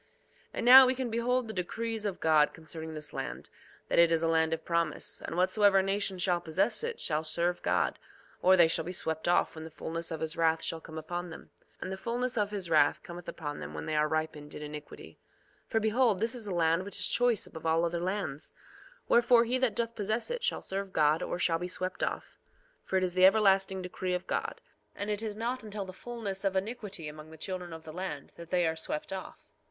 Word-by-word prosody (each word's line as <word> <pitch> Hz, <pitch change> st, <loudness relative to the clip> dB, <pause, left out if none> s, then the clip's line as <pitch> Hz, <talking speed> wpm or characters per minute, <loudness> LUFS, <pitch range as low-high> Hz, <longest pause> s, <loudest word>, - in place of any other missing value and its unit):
2:9 -, -, -36 dB, 0.5 s
And -, -, -2 dB
now, 260 Hz, +1 st, +11 dB
we 260 Hz, -, +2 dB
can 255 Hz, -2 st, -3 dB
behold 245 Hz, +1 st, +1 dB
the 220 Hz, -, -5 dB
decrees 220 Hz, +4 st, -2 dB
of 195 Hz, -, -4 dB
God 155 Hz, -2 st, +4 dB
concerning 160 Hz, 0 st, -7 dB
this 150 Hz, -2 st, -4 dB
land, 65 Hz, +4 st, -5 dB, 0.4 s
that -, -, +2 dB
it 170 Hz, -1 st, +6 dB
is 165 Hz, 0 st, +2 dB
a -, -, +3 dB
land 160 Hz, 0 st, +2 dB
of 165 Hz, -, -3 dB
promise; 170 Hz, -2 st, -1 dB
and 165 Hz, -, -5 dB
whatsoever 195 Hz, +1 st, +4 dB
nation 195 Hz, 0 st, 0 dB
shall 180 Hz, -1 st, +1 dB
possess 185 Hz, -, 0 dB
it 470 Hz, 0 st, -3 dB
shall 155 Hz, 0 st, 0 dB
serve 170 Hz, +3 st, 0 dB
God, -, -, +1 dB, 0.4 s
or 185 Hz, +1 st, +6 dB
they 170 Hz, -2 st, +7 dB
shall 165 Hz, 0 st, +1 dB
be 175 Hz, -, -5 dB
swept 160 Hz, -2 st, -2 dB
off 175 Hz, -, +3 dB
when 160 Hz, -, -8 dB
the 160 Hz, -, -8 dB
fulness 165 Hz, +1 st, -5 dB
of 160 Hz, -, -5 dB
his 160 Hz, 0 st, -2 dB
wrath 165 Hz, -1 st, +2 dB
shall 165 Hz, -, -3 dB
come 160 Hz, 0 st, -10 dB
upon 175 Hz, +3 st, -4 dB
them. 160 Hz, -, -11 dB, 0.3 s
And -, -, -4 dB
the 190 Hz, -, -4 dB
fulness 240 Hz, +5 st, -2 dB
of 210 Hz, -3 st, +1 dB
his 200 Hz, -4 st, -3 dB
wrath 155 Hz, -3 st, +3 dB
cometh 175 Hz, +1 st, -8 dB
upon 145 Hz, -3 st, -5 dB
them 75 Hz, +1 st, -7 dB
when 75 Hz, 0 st, -5 dB
they -, -, -2 dB
are 150 Hz, 0 st, +3 dB
ripened 155 Hz, -1 st, -3 dB
in 150 Hz, -, -6 dB
iniquity. 150 Hz, 0 st, -9 dB, 0.5 s
2:10 -, -, -42 dB
For 225 Hz, -, +2 dB
behold, 220 Hz, 0 st, +3 dB
this 225 Hz, +5 st, 0 dB
is 235 Hz, -4 st, -4 dB
a -, -, -3 dB
land 165 Hz, 0 st, +2 dB
which 200 Hz, -, -7 dB
is -, -, +3 dB
choice 240 Hz, -3 st, +2 dB
above 160 Hz, 0 st, -7 dB
all 165 Hz, +1 st, +3 dB
other 170 Hz, 0 st, -1 dB
lands; 185 Hz, -6 st, -3 dB, 0.5 s
wherefore 235 Hz, 0 st, +5 dB
he 250 Hz, +2 st, 0 dB
that 250 Hz, -5 st, +1 dB
doth 235 Hz, 0 st, -1 dB
possess 220 Hz, -, -2 dB
it 485 Hz, 0 st, -3 dB
shall 485 Hz, -, -1 dB
serve 195 Hz, 0 st, -4 dB
God 155 Hz, +1 st, +3 dB
or -, -, -2 dB
shall 165 Hz, -1 st, +1 dB
be 180 Hz, -, -3 dB
swept 185 Hz, +1 st, -4 dB
off; -, -, -3 dB, 0.4 s
for 190 Hz, -, 0 dB
it 185 Hz, -, +1 dB
is 180 Hz, -1 st, -1 dB
the 185 Hz, +1 st, +7 dB
everlasting 195 Hz, -2 st, +3 dB
decree 180 Hz, 0 st, -2 dB
of 180 Hz, -, -4 dB
God. -, -, -3 dB, 0.3 s
And 205 Hz, +1 st, -3 dB
it 210 Hz, 0 st, -2 dB
is 215 Hz, -2 st, -3 dB
not 240 Hz, +3 st, -3 dB
until 210 Hz, -2 st, -5 dB
the 185 Hz, -, -9 dB
fulness 210 Hz, -3 st, -5 dB
of 195 Hz, -1 st, 0 dB
iniquity 200 Hz, -4 st, -3 dB
among 155 Hz, +1 st, -9 dB
the 160 Hz, -, -12 dB
children 180 Hz, +1 st, -5 dB
of 160 Hz, 0 st, -8 dB
the 155 Hz, -, -9 dB
land, 170 Hz, -6 st, -5 dB
that 170 Hz, -1 st, -11 dB
they 180 Hz, -1 st, +2 dB
are 160 Hz, 0 st, 0 dB
swept 160 Hz, +2 st, -4 dB
off. 190 Hz, -, -8 dB
180 Hz, 235 wpm, -30 LUFS, 160-210 Hz, 0.5 s, now